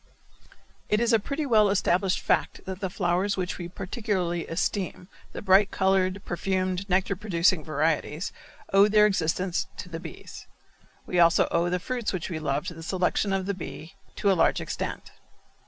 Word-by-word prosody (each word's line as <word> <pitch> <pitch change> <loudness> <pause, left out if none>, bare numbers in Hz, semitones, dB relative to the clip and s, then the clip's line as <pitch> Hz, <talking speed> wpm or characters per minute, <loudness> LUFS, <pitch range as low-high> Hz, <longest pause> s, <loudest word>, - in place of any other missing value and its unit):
It 210 - +3
is 235 0 +2
a 225 - +5
pretty 280 +8 -3
well 215 -6 +4
established 185 -1 +1
fact - - 0
that 190 0 -5
the 190 -2 -2
flowers 185 +2 0
which 185 0 -3
we 175 - -4
particularly 180 -3 -2
esteem, 180 +1 -2 0.2
the - - -7
bright 195 +1 +5
colored, 190 0 +1
perfumed, 185 +1 -2
nectar 190 +2 +1
producing 180 -3 +1
varieties, 155 +2 -1 0.4
owe 200 +1 +7
their 210 0 +5
existence 180 -2 0
to 180 - -7
the 165 -1 -5
bees. 165 -2 -10 0.6
We 180 - 0
also 170 0 +5
owe 170 +1 +2
the 180 - +1
fruits 240 +4 -3
which 185 0 -4
we 160 - -3
love 145 +1 -1
to 180 - -5
the 165 - -10
selection 185 +3 0
of 195 -1 0
the 200 - -1
bee 170 -1 -8 0.2
to 200 - +2
a - - +5
large 170 - +3
extent. - - -5
185 Hz, 170 wpm, -26 LUFS, 175-200 Hz, 0.6 s, owe